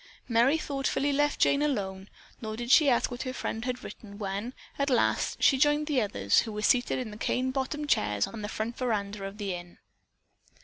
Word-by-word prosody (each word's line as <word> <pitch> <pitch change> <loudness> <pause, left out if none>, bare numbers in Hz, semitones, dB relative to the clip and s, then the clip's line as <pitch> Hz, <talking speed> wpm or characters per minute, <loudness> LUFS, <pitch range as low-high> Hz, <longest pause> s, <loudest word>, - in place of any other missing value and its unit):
Merry 245 +6 +4
thoughtfully 280 -1 -1
left 290 +1 +1
Jane 280 - +3
alone, 195 -9 -2 0.3
nor 220 -1 -5
did 240 +1 -3
she 300 -1 +7
ask 245 0 +2
what 245 - -5
her 255 - -4
friend 225 -2 -4
had 250 0 -3
written 200 -2 -10
when, 205 +4 -4 0.2
at 280 0 +1
last, 250 - +1
she 270 - +5
joined 295 +1 +3
the 290 -5 +1
others, 100 - +2
who 225 - -2
were 210 0 -5
seated 245 +3 +3
in 245 -4 -4
the 210 - -9
cane 255 +3 0
bottomed 280 +3 -3
chairs 105 - +2
on 225 - -8
the 205 - -4
front 220 +2 -3
veranda 210 -5 -2
of 195 +1 -6
the 200 -3 -3
inn. 175 0 -9
240 Hz, 205 wpm, -28 LUFS, 205-270 Hz, 0.3 s, she